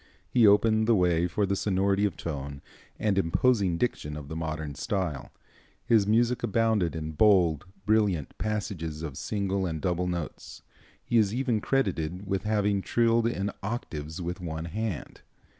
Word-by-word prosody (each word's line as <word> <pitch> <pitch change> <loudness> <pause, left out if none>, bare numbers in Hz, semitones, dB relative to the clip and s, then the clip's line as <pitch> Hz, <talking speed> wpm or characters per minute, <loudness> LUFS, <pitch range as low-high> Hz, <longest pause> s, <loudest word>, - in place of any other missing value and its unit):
He 115 -3 +5
opened 110 +2 +4
the 115 - +5
way 90 -2 +2
for 100 +4 0
the 100 0 0
sonority 100 +1 +1
of 95 -6 -2
tone 70 -3 -5 0.3
and 100 -3 +1
imposing 95 0 +2
diction 75 -9 -2
of 70 -1 -8
the 80 - -5
modern 80 -2 -4
style. 85 -3 -3 0.6
His 115 -4 +4
music 120 +3 +2
abounded 110 -6 +1
in 80 -1 -4
bold, 85 -2 +3 0.2
brilliant 105 -8 +1
passages 95 -7 -3
of 75 -4 -5
single 100 +1 -1
and 80 -2 -3
double 90 +3 -1
notes. 85 -4 -5 0.4
He 120 - +3
is 105 0 +2
even 125 -4 0
credited 95 -9 -1
with 95 0 -2
having 105 -2 +1
trilled 115 +2 +2
in 100 -3 -1
octaves 80 -8 -5
with 90 0 -4
one 80 -2 -4
hand. 100 0 -4
95 Hz, 155 wpm, -28 LUFS, 80-110 Hz, 0.6 s, He